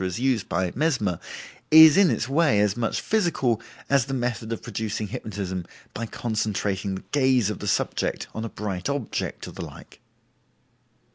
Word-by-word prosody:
as 90 +4 -2
used 125 -5 0
by 90 +1 0
Mesmer, 120 - 0 0.5
is 160 0 +9
in 195 -3 +6
its - - -1
way 140 -5 +3
as 105 -1 +2
much 120 -1 -1
physical 150 - +1 0.3
as 140 -3 +3
the 135 - -2
method 120 -3 -2
of 115 - -4
producing 110 -1 -3
hypnotism 95 -4 -4 0.3
by 115 +1 -4
concentrating 105 -4 -2
the 95 - -7
gaze 130 -6 +3
of - - -6
the 105 - -5
subject - - 0
on 110 - -4
a 115 - -4
bright 100 0 -4
object, 140 -5 -3
or - - -8
the - - -7
like. - - -12
115 Hz, 165 wpm, -25 LUFS, 100-135 Hz, 0.5 s, is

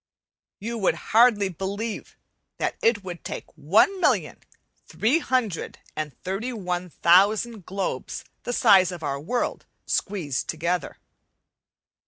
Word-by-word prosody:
You 230 +3 -4
would 195 - +2 0.2
hardly 220 -3 +6
believe 200 +5 -5 0.4
that - - -1
it 225 -3 +2
would 175 -2 -7
take - - -7
one 295 - +3
million, - - +1 0.5
three 260 +9 +2
hundred 245 - -1 0.2
and 150 -4 -5
thirty 195 +7 -3
one 180 -5 -3
thousand 200 +5 +3
globes 195 0 -4 0.2
the - - -4
size 195 -7 +5
of 175 -3 -8
our 140 -1 -2
world 240 - -2 0.2
squeezed 175 -10 -1
together. 170 +1 -2
195 Hz, 120 wpm, -25 LUFS, 175-230 Hz, 0.5 s, hardly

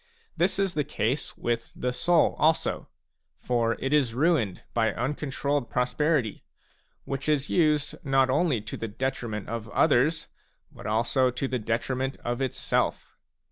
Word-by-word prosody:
This 180 +3 +2
is 195 -2 +1
the 150 - 0
case 135 -2 -2
with 115 -1 -2
the 125 0 -2
soul 170 +5 +3
also; 160 +1 +1 0.5
for 115 -2 +1
it 135 +2 -2
is 130 -6 +2
ruined 135 - +1
by 110 -2 +2
uncontrolled 140 +1 -2
prosperity, 125 -1 0 0.6
which 135 +2 -3
is 150 -2 +1
used 150 -4 +2
not 135 -1 +3
only 140 -3 +2
to 110 - -7
the 115 - -4
detriment 115 -2 -3
of 115 0 -5
others, 150 +9 +3 0.4
but - - -9
also 120 +4 +2
to 125 +2 -2
the 130 -1 -1
detriment 125 +4 -2
of 120 +2 -1
itself. 130 -2 -1
130 Hz, 140 wpm, -27 LUFS, 115-150 Hz, 0.6 s, soul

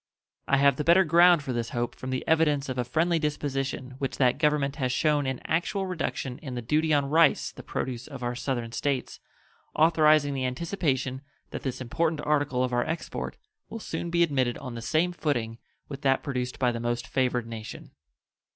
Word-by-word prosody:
I 140 - +3
have 140 -1 +4
the 150 - -1
better 170 +5 +6
ground 170 0 +5
for 130 -3 -3
this 120 -1 -2
hope 120 0 -2
from 130 - -7
the 130 0 -3
evidence 150 -4 +2
of 130 -1 -3
a - - +2
friendly 165 +7 +1
disposition 140 -3 -2
which 135 - -3
that 130 +1 +2
Government 150 -2 +1
has 130 -4 0
shown 145 +1 +1
an 130 -1 -2
actual 185 +4 0
reduction 160 -8 -3
in 130 -5 -7
the 120 - -3
duty 155 +6 +1
on 145 -2 +3
rice 160 +3 +3
the - - -11
produce 125 -2 -4
of 135 -3 -8
our 120 0 -1
Southern 120 -2 -3
States, 135 +3 -2 0.6
authorizing 155 -2 +4
the 135 -1 -2
anticipation 135 -3 -2 0.3
that - - -5
this 130 -3 -4
important 155 +5 -1
article 145 -4 +1
of 125 -1 -2
our 120 0 +2
export 160 +1 -4 0.3
will - - -6
soon 170 -5 -4
be 170 0 +3
admitted 130 -6 0
on 130 -3 -7
the 115 - -6
same 155 +9 +1
footing 120 -9 -2 0.3
with 140 -1 -7
that 135 -2 +2
produced 125 -3 -3
by 125 -2 +2
the 120 - -4
most 120 0 -2
favored 125 -1 0
nation. 115 -1 -8
140 Hz, 195 wpm, -27 LUFS, 125-155 Hz, 0.6 s, better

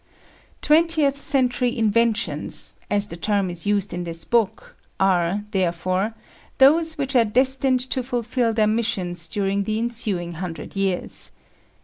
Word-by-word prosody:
Twentieth 305 -3 +2
century 250 -2 0
inventions 230 +1 +4 0.2
as 205 0 +2
the 185 - -9
term 195 +1 -1
is 175 +3 -6
used 205 -2 0
in 175 0 -4
this 165 -1 -5
book 230 -5 -1 0.2
are, 190 +1 +1
therefore, 185 +3 -1 0.4
those 320 +4 +4
which 270 -1 -3
are 240 - +5
destined 260 +3 +1
to 260 - 0
fulfil 245 -1 -2
their 220 -1 +1
missions 190 -6 -2
during 200 +2 -2
the 215 +2 -2
ensuing 220 -7 -3
hundred 165 0 -7
years. 195 -2 -2
215 Hz, 130 wpm, -22 LUFS, 185-250 Hz, 0.4 s, are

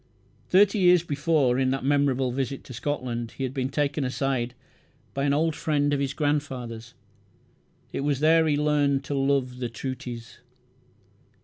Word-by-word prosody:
Thirty 200 +3 +5
years 180 -2 +5
before, 145 -5 +1
in 130 -1 +2
that 135 0 -1
memorable 135 -2 +2
visit 135 +1 -3
to 125 - -10
Scotland, 120 -3 -3
he 135 - -3
had 130 -1 -2
been 130 -1 -2
taken 145 +1 -1
aside 125 -2 -1 0.6
by 140 0 -1
"an 140 - +2
old 155 +2 +1
friend 145 -2 +1
of 140 - +1
his 135 -1 -1
grandfather's". 130 -6 -3 1.0
It - - -2
was 140 -1 0
there 160 +1 +4
he 145 -2 +2
learned 145 -2 +2
"to 140 - -4
love 135 -2 0
the 120 -2 -2
trooties". 120 -1 -7
140 Hz, 155 wpm, -26 LUFS, 130-145 Hz, 1.0 s, Thirty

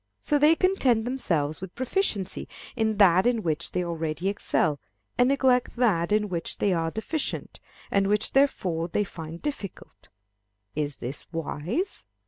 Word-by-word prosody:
So 295 -1 +1
they 305 +3 +6
content 270 - +2
themselves 170 - -1
with 190 -1 -8
proficiency 260 - -1 0.3
in 220 -3 0
that 190 0 +6
in 235 -3 +1
which 160 0 -1
they 180 - -1
already 165 +1 -2
excel, 155 -6 0 0.4
and 245 +1 +4
neglect 260 -3 +2
that 205 -9 +2
in 210 0 +3
which 170 -4 -3
they 200 - +2
are 165 -1 0
deficient, 245 - -3 0.3
and 195 -1 +3
which 210 +1 +1
therefore 180 -12 +2
they 205 +4 0
find 165 -3 -8
difficult. 275 -10 -6 0.7
Is 145 -2 -2
this 125 +4 -7
wise? 175 - -3
200 Hz, 145 wpm, -26 LUFS, 165-250 Hz, 0.7 s, they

